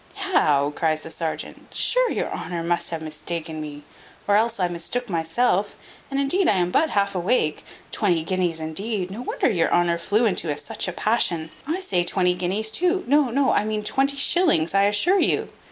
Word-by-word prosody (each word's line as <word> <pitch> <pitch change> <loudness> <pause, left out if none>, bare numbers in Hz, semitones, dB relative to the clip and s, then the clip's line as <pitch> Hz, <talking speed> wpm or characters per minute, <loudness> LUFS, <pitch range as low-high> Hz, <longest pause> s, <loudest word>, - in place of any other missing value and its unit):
"How!" 150 - +2
cries 155 0 0
the 160 - -9
serjeant, 160 -1 -5
"sure - - +2
your - - -2
honour 170 -2 -4
must 170 0 -1
have 165 -2 -4
mistaken 155 +1 -5
me: 145 -1 -8 0.4
or 205 - +4
else 225 +1 +1
I 180 - +2
mistook 175 +8 -4
myself 180 +5 0 0.3
and 275 0 -1
indeed 345 +7 +2
I - - +5
am 180 -1 +1
but 315 - +2
half 200 -3 +1
awake. 175 -4 0 0.3
Twenty 175 -6 +1
guineas, 175 -2 0
indeed! 185 +4 -3
no 215 +5 -6
wonder - - -1
your 170 -5 +1
honour 175 -1 +2
flew 210 +7 +1
into 170 -8 0
such - - -3
a - - -1
passion. 170 -6 0 0.2
I 340 +5 -2
say 180 - 0
twenty 180 0 +2
guineas 190 +5 -1
too. 360 - +1
No, 285 0 +3
no, 270 +3 +2
I - - +2
mean 215 0 -2
twenty 275 +5 +1
shillings, 280 - +2
I 200 0 +4
assure 265 - +3
you. - - +1
190 Hz, 185 wpm, -23 LUFS, 165-245 Hz, 0.4 s, I